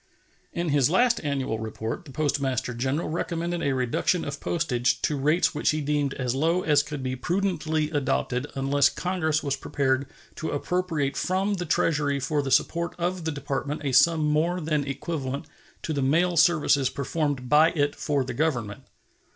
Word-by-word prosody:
In 170 -1 -2
his 145 -2 +3
last 235 +5 +3
annual 135 -6 -2
report 110 +6 -5
the 140 - -11
Postmaster 135 -3 -1
General 130 +6 -1
recommended 170 +1 -2
a 140 -4 0
reduction 130 +7 0
of 140 0 -5
postage 125 -8 0
to 150 - +1
rates 150 +5 +2
which - - 0
he 155 - +1
deemed 145 -1 0
as 125 -2 -1
low 165 +6 +1
as 150 -2 +4
could 145 -2 -6
be 130 0 -2
prudently 160 -2 -1
adopted 135 -2 -1
unless 140 +1 +3
Congress 160 -4 -1
was 140 -2 0
prepared 135 -1 -1 0.3
to 160 - -3
appropriate 160 -3 -1
from 190 +2 0
the 180 -3 -3
Treasury 145 -3 +1
for 145 +2 0
the 135 - -3
support 170 +5 +1
of 175 0 -2
the 160 - 0
Department 145 +1 -3
a 135 - 0
sum 155 +5 +4
more 160 +4 +1
than 150 -3 -1
equivalent 140 -1 -4 0.4
to 160 - -2
the 140 - -1
mail 170 +7 +2
services 155 -5 +4
performed 140 -2 -2
by 150 +4 +6
it 145 -3 0
for 145 -3 0
the 130 - -5
Government. 120 -7 -1
145 Hz, 170 wpm, -26 LUFS, 135-165 Hz, 0.4 s, by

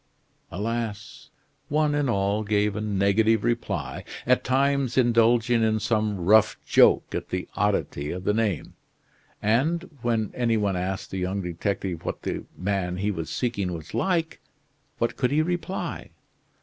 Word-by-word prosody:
Alas! 105 +1 -4 0.4
one 150 0 +2
and 145 -2 +1
all 100 -1 +1
gave 105 -1 +1
a 105 - -2
negative 105 +1 +2
reply, 100 - -2 0.2
at 125 +1 +3
times 135 0 +1
indulging 120 -1 +4
in 110 -1 +2
some 110 -2 0
rough 110 +2 +5
joke - - +4
at - - -4
the 90 0 -3
oddity 100 -8 0
of 90 +3 -5
the 105 - +2
name. 105 -6 -1 0.7
And 150 - +1
when 115 -3 0
any 115 -2 +1
one 100 -3 0
asked 95 +1 -3
the 95 - -3
young 95 +2 -2
detective 90 0 -3
what - - -4
the - - -3
man 90 -2 -1
he 100 +2 0
was 80 -5 -5
seeking 100 -7 -2
was 80 -2 -8
like, 170 -4 0 0.6
what 115 - -1
could 125 - +1
he 150 +2 +2
reply? 175 +3 -3
110 Hz, 150 wpm, -25 LUFS, 95-120 Hz, 0.7 s, rough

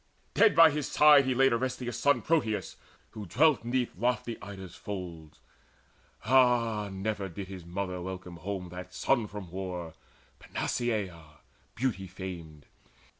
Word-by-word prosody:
Dead 225 - +5
by 165 -1 +8
his 150 -1 -2
side 150 -2 +7
he 130 -1 0
laid 135 -1 +4
Orestius' 125 0 -2
son, 145 +2 +3
Proteus, 120 -10 0 0.4
who 105 -3 -8
dwelt 145 - +3
'neath 120 +1 -1
lofty 120 -1 -1
Ida's 95 -3 -9
folds. 85 -6 -7 0.9
Ah, 120 -5 +3
never 100 0 -3
did 95 +2 -7
his 90 -3 -9
mother 90 0 -3
welcome 90 -1 -7
home 90 +1 -5
That 90 +1 -9
son 120 -5 +1
from 100 -5 -8
war, 90 -3 -5 0.5
Panaceia 105 -9 -2 0.5
beauty 110 -7 -1
famed! 85 -5 -8
100 Hz, 130 wpm, -29 LUFS, 90-125 Hz, 0.9 s, by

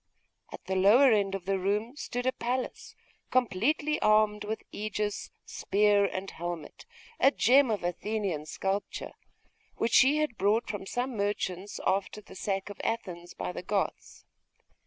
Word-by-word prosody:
At - - -10
the 190 - -2
lower 220 +8 +6
end 200 -3 +2
of 195 - -6
the 195 0 0
room 210 +6 -1
stood 245 -3 -4
a 260 - +3
Pallas, 250 +1 -4 0.3
completely 255 +6 +1
armed 215 0 +3
with 220 +1 -4
aegis, 210 0 -3 0.2
spear, 205 0 +2
and 195 0 -4
helmet; 170 - -7 0.3
a 270 - +6
gem 270 0 +4
of 210 -5 -1
Athenian 180 -3 -2
sculpture, 195 +5 -3 0.6
which 230 - -1
she 275 +3 +6
had 305 -8 -1
bought 210 +5 +2
from 205 -2 -5
some 245 +3 -2
merchants 200 -2 -2
after 195 +2 0
the 210 - -14
sack 195 +1 -3
of 205 - -9
Athens 180 -6 -4
by 90 -1 -4
the - - -6
Goths. - - -3
210 Hz, 150 wpm, -29 LUFS, 195-235 Hz, 0.6 s, lower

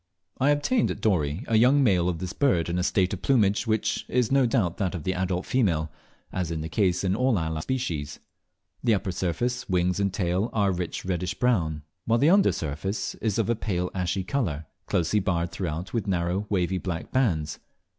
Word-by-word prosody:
I 135 - +3
obtained 145 - +2
at - - -4
Dorey 90 - 0
a 115 - +3
young 135 +4 +5
male 90 -7 +3
of 85 - -2
this 90 +2 -5
bird, 105 - +2
in 85 +1 -1
a - - 0
state 95 0 +1
of 95 - -5
plumage 110 -5 +2
which 110 0 0
is 125 -2 +1
no 135 -2 +4
doubt 105 -9 0
that 95 -1 -1
of 85 - -5
the 95 - 0
adult 90 0 -1
female, 85 -11 +1 0.4
as 90 -3 -2
is 80 -1 -3
the 80 +1 -4
case 90 0 +1
in 95 0 +1
all 125 +2 +2
the 90 - 0
allied 80 -1 -2
species. 85 - -3 0.7
The 115 -3 +4
upper 95 -1 -2
surface, 100 +9 -2
wings, 90 +1 +1
and 100 -1 +1
tail 95 +4 0
are 100 -3 +2
rich 90 -1 -4
reddish 90 +1 -2
brown, 85 - 0 0.2
while 115 +1 +3
the 145 +7 +4
under 195 0 +5
surface 80 +7 -3
is 110 -4 0
of 115 - +1
a 120 - +2
pale 90 -5 -2
ashy 95 +1 -1
colour, 90 - -2 0.2
closely 90 +5 +1
barred 85 -3 -1
throughout 85 -1 -4
with 115 -3 -1
narrow 90 +2 -1
wavy 95 -2 0
black 85 -4 -5
bands. 80 - 0
95 Hz, 205 wpm, -26 LUFS, 85-115 Hz, 0.7 s, young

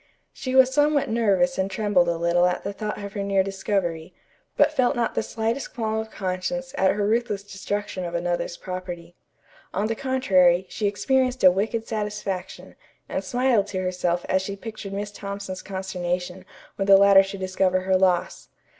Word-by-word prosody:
She 260 -3 -4
was 260 0 +6
somewhat 295 0 +2
nervous 230 +3 +2
and 190 +1 0
trembled 195 -3 +2
a 170 -1 0
little 170 +1 +3
at 180 - -2
the 200 - -4
thought 210 +1 -4
of 200 0 -7
her 205 - -3
near 195 -1 +2
discovery, 190 -4 -2 0.4
but - - +5
felt 250 -2 +2
not 240 -2 0
the - - 0
slightest 230 +4 -3
qualm 220 -2 -1
of 220 0 -5
conscience 220 +9 -3
at 190 -8 +3
her 205 -1 0
ruthless 215 -2 0
destruction 205 0 -4
of 170 -1 -4
another's 175 0 -2
property. 175 -2 -7 0.6
On 200 - 0
the 225 - 0
contrary, 195 -9 +3
she 210 - -1
experienced 255 +4 0
a 185 - +9
wicked 220 +4 -2
satisfaction, 210 -4 -4 0.3
and - - -3
smiled 245 -5 +1
to 185 - -3
herself 180 -1 -1
as 190 0 +2
she 195 +1 -5
pictured 210 -1 -8
Miss 205 +1 -4
Thompson's 200 -2 -6
consternation 185 -1 -4 0.3
when 195 - -1
the 195 -1 +8
latter 200 0 +7
should 195 0 -6
discover 185 0 +1
her 190 0 +1
loss. 185 -2 +1
195 Hz, 175 wpm, -24 LUFS, 185-220 Hz, 0.6 s, a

